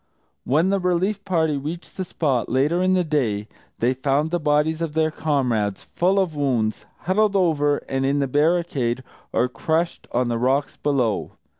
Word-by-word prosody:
When 160 +8 +2
the 200 - +2
relief 185 +3 0
party 160 -6 +1
reached 155 +5 -6
the 190 - -2
spot, 140 -8 -1
later 145 +8 +2
in 185 0 +3
the 180 - +2
day, 120 -10 -1 0.3
they 120 +3 +2
found 140 +4 0
the 175 - 0
bodies 150 +1 +1
of 165 -3 -2
their 160 0 +1
comrades, 125 -11 0
full 185 +3 0
of 185 -5 +1
wounds, 125 -7 -1
huddled 205 +3 +1
over 150 -6 +2
and 135 0 -1
in 140 +2 +1
the 140 - +1
barricade, 145 -4 +1 0.3
or 125 - +2
crushed 160 +8 -2
on 125 +1 +1
the 120 -1 -1
rocks 135 +4 +1
below. 130 -7 0
150 Hz, 170 wpm, -23 LUFS, 130-170 Hz, 0.3 s, in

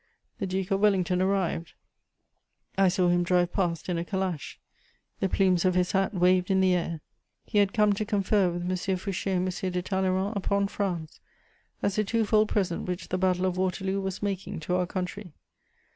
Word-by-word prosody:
The 195 - -2
Duke 190 +1 -3
of 195 - +2
Wellington 185 -3 +2
arrived: 185 -3 0 1.0
I 195 0 +4
saw 180 -1 +2
him 175 0 +3
drive 175 0 +2
past 170 -5 -1
in 175 -2 -1
a - - -2
calash; 185 -4 -3 0.6
the 195 - 0
plumes 185 -3 +2
of 185 -1 +2
his 180 -1 +2
hat 195 -1 +1
waved 180 -1 +3
in 190 -1 +3
the 185 -1 +4
air; 170 -3 -2 0.4
he 210 - +1
had 200 -1 +3
come 210 -2 +3
to 200 - -2
confer 205 -2 +2
with 175 0 -4
M. 180 - -2
Fouché 185 +1 -2
and 180 +1 +1 0.2
M. 185 - 0
de 180 0 -1
Talleyrand 190 +2 0
upon 200 0 +1
France, 175 -7 -3 0.6
as 200 +1 +1
a - - +3
twofold 215 0 +2
present 185 -5 -1
which 180 0 -4
the 185 - -1
Battle 185 0 +2
of 185 -1 -1
Waterloo 190 +1 -1
was 190 +1 -4
making 195 -4 -3
to 170 +3 -2
our 180 0 +1
country. 185 -1 -5
185 Hz, 190 wpm, -27 LUFS, 180-195 Hz, 1.0 s, I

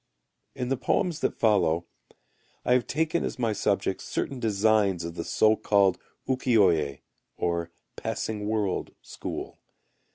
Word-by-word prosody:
In 125 -1 -3
the 135 - +1
poems 160 +6 0
that - - -1
follow 85 -7 +2 0.8
I 125 - +4
have 125 -1 +2
taken 160 +2 0
as - - -3
my 115 -3 0
subjects 100 -2 0
certain 135 - -3
designs 105 -4 +2
of 85 0 -5
the 85 - -4
so 110 +5 +3
called 100 -3 +3 0.3
Uki 130 -2 +2
oye 80 -9 +3 0.4
(or 85 -1 -1 0.3
Passing 105 -2 -3
World) 105 -4 -1
school. - - -6
105 Hz, 135 wpm, -27 LUFS, 90-125 Hz, 0.8 s, I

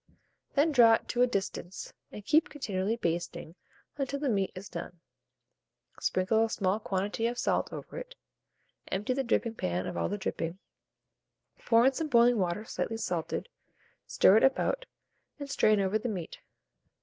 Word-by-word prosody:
Then 300 +3 +4
draw 235 -5 +7
it - - -7
to 245 - 0
a 250 - +6
distance, 190 -4 -4 0.2
and 210 - -9
keep 320 +8 +3
continually 210 -6 -2
basting 170 -5 -3 0.4
until 275 0 -2
the 285 -2 0
meat 195 -4 0
is 190 +2 -8
done. 175 -3 -7 1.0
Sprinkle 210 +5 +2
a 225 - 0
small 200 -1 0
quantity 205 +3 -1
of 240 +1 -3
salt - - 0
over - - -7
it, - - -10 0.7
empty 205 +6 -1
the 270 +1 -1
dripping 230 -1 0
pan 90 - -2
of - - -5
all - - -1
the 205 - -2
dripping, 170 -3 -3 1.1
pour 230 0 +5
in 270 - +5
some 315 +4 -2
boiling 240 -3 +5
water 185 +3 -1
slightly 225 0 -3
salted, 170 - -3 0.6
stir 195 - +5
it - - +3
about, - - +1 0.5
and 285 -1 -7
strain 215 -5 +3
over 195 +2 +1
the 240 +2 -3
meat. 180 -6 -5
220 Hz, 160 wpm, -30 LUFS, 190-250 Hz, 1.1 s, draw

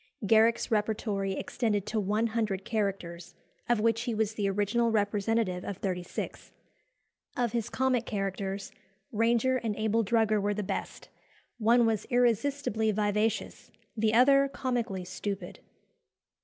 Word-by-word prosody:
Garrick's 225 +3 +3
repertory 210 -2 0
extended 210 -2 -1
to 220 - -1
one 210 +3 0
hundred 215 -4 -1
characters, 195 -6 -3 0.3
of 240 -2 +3
which 230 +1 +2
he 235 -1 -2
was 220 0 0
the 205 -2 -1
original 205 +4 +1
representative 205 -2 0
of 200 - -5
thirty 185 -3 -2
six. 175 - -6 0.9
Of 240 -2 +1
his 235 -3 -2
comic 255 -3 0
characters, 195 -1 -3 0.4
Ranger 235 +3 +2
and 225 -4 -2
Abel 220 +1 +1
Drugger 215 -1 +2
were 205 +1 0
the 210 - -2
best - - -5 0.5
one 235 +2 +4
was 220 -2 0
irresistibly 240 -1 +1
vivacious, 210 +1 -1 0.3
the 220 0 +1
other 275 +3 +6
comically 240 -9 -3
stupid. 195 +2 -5
220 Hz, 130 wpm, -29 LUFS, 200-230 Hz, 0.9 s, other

